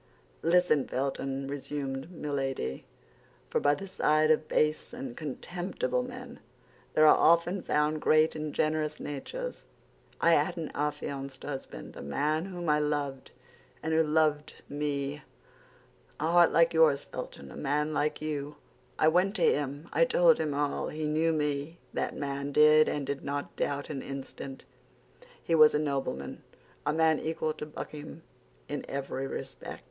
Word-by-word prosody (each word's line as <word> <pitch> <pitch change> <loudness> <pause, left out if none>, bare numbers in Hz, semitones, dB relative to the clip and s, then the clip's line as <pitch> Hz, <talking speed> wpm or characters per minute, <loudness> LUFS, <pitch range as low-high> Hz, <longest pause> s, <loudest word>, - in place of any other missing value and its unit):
"Listen, 165 -4 +3
Felton," 135 0 -2
resumed 140 0 -4
Milady, 135 - -3 0.7
"for - - +2
by 145 0 +3
the 195 - -7
side 155 -4 +3
of 155 0 +2
base 155 +8 +1
and 250 0 -6
contemptible 180 - -3
men - - -8 0.6
there 155 - +6
are 155 - +8
often 170 +3 +4
found 150 0 +1
great 155 +1 +4
and 155 -1 -3
generous 155 0 0
natures. - - -5 0.5
I 170 - +4
had 150 +1 +3
an 160 -3 -4
affianced 140 -2 -3
husband, 135 - -7
a - - -8
man 150 - 0
whom 175 -3 -6
I 150 0 +4
loved, 145 -3 -2 0.5
and 160 0 -1
who 160 - +5
loved 150 -1 +1
me—a 145 0 -2 1.0
heart 170 +3 +5
like 165 +1 +4
yours, 160 -4 +4
Felton, 70 -1 -8
a - - -10
man 150 +2 0
like 150 +1 0
you. 150 -1 -3 0.4
I - - +4
went 180 +5 +3
to 185 - 0
him 145 +2 +1
and - - +4
told - - +5
him 150 -2 -1
all; 145 0 0
he 155 0 -3
knew 160 +2 +2
me, 150 +1 -1 0.2
that - - -2
man 140 0 -3
did, 150 +1 +6
and 145 -2 -2
did 140 0 -3
not 145 0 -4
doubt 145 +1 -2
an 135 -3 -4
instant. 135 0 -7 0.8
He - - -1
was 155 -2 +7
a - - +3
nobleman, 135 - -3 0.5
a - - +4
man 160 0 +3
equal 160 -1 -2
to 150 - -7
Buckingham 155 +1 -8 0.4
in 145 - -4
every 135 -1 -3
respect. - - -7
150 Hz, 150 wpm, -30 LUFS, 140-160 Hz, 1.0 s, are